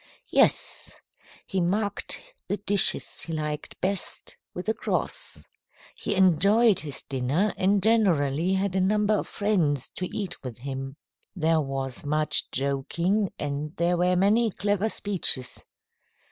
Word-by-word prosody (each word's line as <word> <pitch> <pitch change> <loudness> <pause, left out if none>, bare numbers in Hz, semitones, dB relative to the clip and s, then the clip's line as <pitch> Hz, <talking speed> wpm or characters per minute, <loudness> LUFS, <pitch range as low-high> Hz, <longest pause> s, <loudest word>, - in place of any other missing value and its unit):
"Yes. - - +1 0.5
He 190 - -2
marked 205 +4 -1 0.3
the 205 - -1
dishes 205 0 +3
he 165 - -5
liked 150 -1 -5
best 195 +1 -2 0.2
with 180 +3 -7
a 220 - +2
cross. - - -2 0.5
He - - -2
enjoyed 195 +4 +4
his 145 -7 -5
dinner, 140 +10 -1
and 195 +1 +1
generally 180 -7 +2
had 190 0 -1
a 190 - +2
number 210 +2 +2
of 210 - -1
friends 170 - 0
to 180 - -2
eat 205 -7 -5
with 125 -4 -7
him. 135 +2 -6 0.4
There 160 -2 +2
was 135 -2 -4
much 150 0 +1
joking, 170 +9 -1
and 145 +2 -4
there 170 +1 +1
were 180 +1 +2
many 210 +5 +3
clever 205 +2 -1
speeches. 185 - +1
180 Hz, 130 wpm, -26 LUFS, 145-205 Hz, 0.5 s, enjoyed